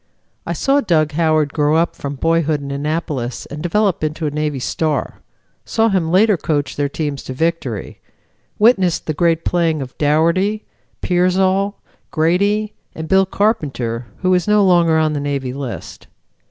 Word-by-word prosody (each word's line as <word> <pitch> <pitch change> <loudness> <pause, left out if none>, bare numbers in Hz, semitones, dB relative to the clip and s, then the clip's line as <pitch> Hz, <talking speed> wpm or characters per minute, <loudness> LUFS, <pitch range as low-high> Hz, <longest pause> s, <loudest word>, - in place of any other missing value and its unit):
I - - -1
saw 280 +1 +2
Dug 160 - +1
Howard 155 -2 +1
grow 150 0 +2
up 165 +1 +1
from 140 0 -5
boyhood 160 0 +1
in 140 -1 -7
Annapolis 145 -3 -3
and 150 +1 -8
develop 190 +1 0
into 155 +1 -2
a 150 - -1
Navy 150 -1 -2
star; 150 +4 -2 0.4
saw 225 0 +1
him 185 -5 0
later 205 +2 +4
coach 145 -4 -2
their 145 -1 -1
teams 145 -2 -3
to 130 - -5
victory; 140 - -3 0.6
witnessed 200 -6 +3
the 155 - -1
great 165 +1 +1
playing 165 -3 +1
of 130 -2 -7
Dougherty, 170 +8 +1 0.4
Piersol, 190 +3 +1 0.3
Grady 200 +6 +1 0.2
and 160 0 -6
Bill 190 +1 +3
Carpenter, 135 - -1 0.2
who 185 0 +3
is 180 0 +1
no 210 -1 +4
longer 170 -3 +4
on 155 -1 +1
the 145 - -2
Navy 140 -3 -3
list. 135 -3 -7
160 Hz, 155 wpm, -18 LUFS, 145-185 Hz, 0.6 s, later